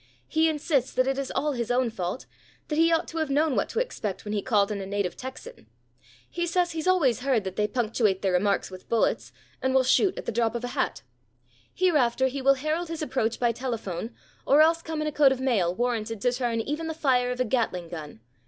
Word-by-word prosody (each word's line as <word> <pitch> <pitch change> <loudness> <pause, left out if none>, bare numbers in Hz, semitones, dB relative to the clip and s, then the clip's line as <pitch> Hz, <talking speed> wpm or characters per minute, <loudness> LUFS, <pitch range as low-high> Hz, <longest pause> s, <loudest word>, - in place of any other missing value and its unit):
"He 320 +1 +2
insists 295 -4 0
that 255 - +2
it 270 +1 0
is 275 - -3
all 300 +1 +1
his 240 -4 -3
own 245 -1 +1
fault, 185 +2 -4 0.4
that 300 - -1
he 330 +1 +5
ought 330 - +1
to 325 - -4
have 315 -2 -1
known 290 +1 +2
what - - 0
to - - -2
expect 215 - -3
when 210 - -3
he 205 - 0
called 210 -3 +2
on 200 -1 -3
a - - -5
native 200 -2 -2
Texan. 265 - -9 0.6
He 345 0 -3
says 350 0 +1
he's 325 +1 -4
always 290 - +3
heard 255 -4 +1
that 190 -1 -5
they 210 - +1
punctuate 215 -3 0
their 190 - +2
remarks 195 +2 +1
with 185 0 -11
bullets 230 - +1 0.3
and 260 0 0
will 265 - +5
shoot 370 +9 +3
at - - -6
the - - -2
drop 230 0 0
of 235 - -3
a 245 - -3
hat. - - -2 0.7
Hereafter 265 -8 +2
he 275 +1 -5
will 275 +1 +5
herald 310 +5 -2
his 325 -1 -4
approach 235 -6 -1
by 240 -1 +2
telephone 230 -4 -4 0.3
or 290 +3 +6
else 330 +1 +3
come 320 -2 -4
in 305 - -1
a - - -1
coat 285 -2 +5
of 265 - -1
mail 205 -10 +1
warranted 225 -2 -1
to 245 - +2
turn 240 -2 -1
even 300 +7 -3
the 320 - -4
fire 255 -5 +2
of 250 0 -3
a 255 - +2
Gatling 210 -8 -1
gun. 155 -9 -8
255 Hz, 235 wpm, -26 LUFS, 220-305 Hz, 0.7 s, or